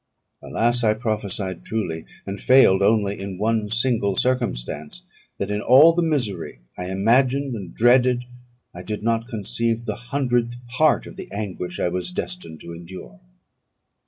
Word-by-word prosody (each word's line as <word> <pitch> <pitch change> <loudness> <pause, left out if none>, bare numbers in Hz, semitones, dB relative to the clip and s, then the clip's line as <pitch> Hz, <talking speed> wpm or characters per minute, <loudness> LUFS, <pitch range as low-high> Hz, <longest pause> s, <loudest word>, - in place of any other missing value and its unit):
Alas! 120 +1 +1
I 110 -1 +3
prophesied 105 -5 -3
truly, 85 -8 -3 0.2
and 100 +1 -6
failed 125 -8 +6
only 100 -1 +2
in 95 -1 -6
one 110 0 0
single 110 -3 +1
circumstance, 80 - -2 0.3
that 100 +1 -3
in 105 0 -1
all 140 +9 +7
the 175 - +1
misery 120 - -2 0.2
I 90 0 -5
imagined 125 +7 +2
and 95 -6 -6
dreaded, 125 +1 +4 0.5
I 90 - -8
did 105 +3 -5
not 115 0 0
conceive 115 0 -2
the 105 -3 -2
hundredth 120 -4 0
part 145 +6 +2
of - - -11
the - - -9
anguish 95 -4 -5
I - - +1
was 90 - -3
destined 180 - -6
to 85 - -8
endure. 90 +1 -10
110 Hz, 150 wpm, -23 LUFS, 95-125 Hz, 0.5 s, all